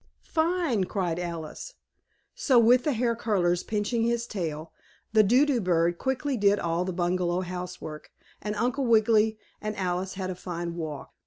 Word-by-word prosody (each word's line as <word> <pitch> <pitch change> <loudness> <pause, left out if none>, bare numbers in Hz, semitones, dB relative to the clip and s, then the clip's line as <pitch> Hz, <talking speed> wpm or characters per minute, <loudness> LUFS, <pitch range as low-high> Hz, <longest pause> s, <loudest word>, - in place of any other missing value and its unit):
"Fine!" 320 - +1
cried 175 -4 -2
Alice. 170 -3 -6 0.6
So 325 - +2
with 240 +2 +5
the 300 - +2
hair 235 0 +1
curlers 180 -6 +1
pinching 215 +2 -1
his 235 0 0
tail 165 -7 -5 0.4
the 220 - +7
Do 245 +8 +4
do 270 -5 +1
bird 175 -2 +1
quickly 265 +1 -1
did 205 -1 +4
all 170 -1 -1
the 185 - -2
bungalow 175 0 0
housework, 180 -4 -7 0.3
and 210 0 -3
Uncle 250 +4 0
Wiggily 220 -1 +4 0.2
and 215 0 -3
Alice 185 0 -2
had 185 -1 -3
a - - -2
fine 175 -1 -5
walk. 155 -4 -6
200 Hz, 160 wpm, -27 LUFS, 175-235 Hz, 0.6 s, the